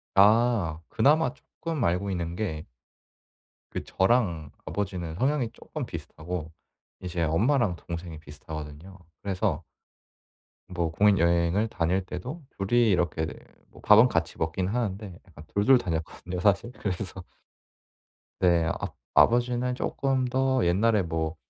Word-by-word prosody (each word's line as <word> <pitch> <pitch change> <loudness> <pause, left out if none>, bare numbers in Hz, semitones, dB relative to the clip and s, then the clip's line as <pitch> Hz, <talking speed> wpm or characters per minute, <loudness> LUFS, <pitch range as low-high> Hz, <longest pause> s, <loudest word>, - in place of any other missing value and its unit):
아. 105 -5 +4
그나마 145 +2 +3
쪼끔 155 -2 -5
알고 95 +2 0
있는 85 -1 -3
게 85 -6 -3 1.0
그 - - -4
저랑 95 - +1
아버지는 90 -5 -3
성향이 130 +1 +1
쪼끔 - - -6
비슷하고 80 0 -6 0.5
이제 90 -2 -2
엄마랑 105 - +2
동생이 85 -2 -7
비슷하거든요. 75 +4 -9 0.2
그래서 95 -4 -1 1.0
뭐 85 -3 -2
국내여행을 85 +1 +3
다닐 90 +1 0
때도 130 - -6 0.2
2 95 +1 -4
이 120 -2 +5
이렇게 85 -3 +1
네 - - -6 0.4
뭐 - - -15
밥은 110 +4 +7
같이 85 -6 -1
먹긴 80 +3 -1
하는데 100 -4 -3
약간 80 -3 -13
2 100 0 -1
2 130 -1 +7
다녔거든요 90 +1 -4
사실. 105 +4 +2
그래서 95 -2 -4 1.2
네. 85 -2 +3
압 - - -5 0.2
아버지는 125 +1 +3
쪼끔 135 0 0
더 130 -2 +1
옛날에 100 +3 +3
뭐 80 0 -2
95 Hz, 260 characters per minute, -27 LUFS, 85-115 Hz, 1.2 s, 밥은